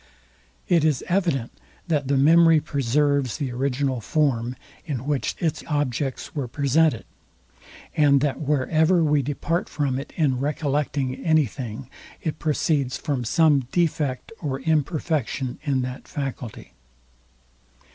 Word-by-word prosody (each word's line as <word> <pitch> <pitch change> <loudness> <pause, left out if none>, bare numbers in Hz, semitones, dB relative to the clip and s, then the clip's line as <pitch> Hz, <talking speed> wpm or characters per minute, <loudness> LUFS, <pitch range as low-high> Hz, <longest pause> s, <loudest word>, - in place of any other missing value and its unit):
It 170 -4 +3
is 155 -4 +1
evident, 170 -10 0 0.4
that 150 -5 0
the 140 0 +2
memory 165 +3 +6
preserves 140 -2 0
the 140 -5 -3
original 130 0 -1
form, 125 -3 0 0.3
in 135 -6 -4
which 145 -2 -1
its 160 -2 -2
objects 145 -3 -2
were 140 -5 -3
presented, 145 0 +2 0.9
and 145 -2 +5
that 145 -2 0
where 145 -3 0
ever 165 +2 +4
we 150 -2 +3
depart 150 +5 -2
from 140 -3 -1
it 140 - -8
in 140 -6 +1
recollecting 145 -2 -1
any 155 -2 +4
thing, 120 +1 -7 0.3
it 155 -1 -4
proceeds 145 -3 0
from 140 -4 -2
some 145 0 +3
defect 150 - 0
or 135 -4 -3
imperfection 150 -4 -1
in 140 -4 0
that 125 +1 -6
faculty. 135 -5 -6
145 Hz, 125 wpm, -24 LUFS, 130-155 Hz, 0.9 s, memory